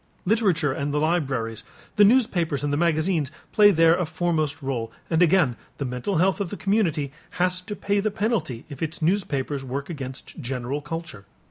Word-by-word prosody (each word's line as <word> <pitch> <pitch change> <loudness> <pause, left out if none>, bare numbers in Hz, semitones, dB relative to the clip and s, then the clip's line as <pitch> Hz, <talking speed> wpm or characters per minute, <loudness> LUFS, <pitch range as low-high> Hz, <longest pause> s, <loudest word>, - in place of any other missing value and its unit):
Literature 185 - +2
and 140 +2 -2
the 145 - 0
libraries, 135 -9 0 0.3
the 210 - +6
newspapers 180 - +3
and 145 0 0
the - - +1
magazines 160 -2 +1 0.2
play 210 -1 +7
there 165 -3 +5
a 180 - 0
foremost 155 -3 -1
rôle, 125 -5 -2 0.2
and 165 +1 +3
again 165 -8 +4 0.2
the 140 - -3
mental 125 +9 -2
health 190 +4 +2
of 195 - -2
the 205 - -6
community 170 -9 0 0.3
has 180 0 +1
to 205 +3 -6
pay 205 0 0
the 215 +2 +1
penalty 205 - -2
if 140 -3 -10
its 160 0 -3
newspapers 150 -6 0
work 140 +5 -4
against 135 0 -7
general 130 +1 -3
culture. 150 -9 -6
160 Hz, 175 wpm, -24 LUFS, 140-185 Hz, 0.3 s, play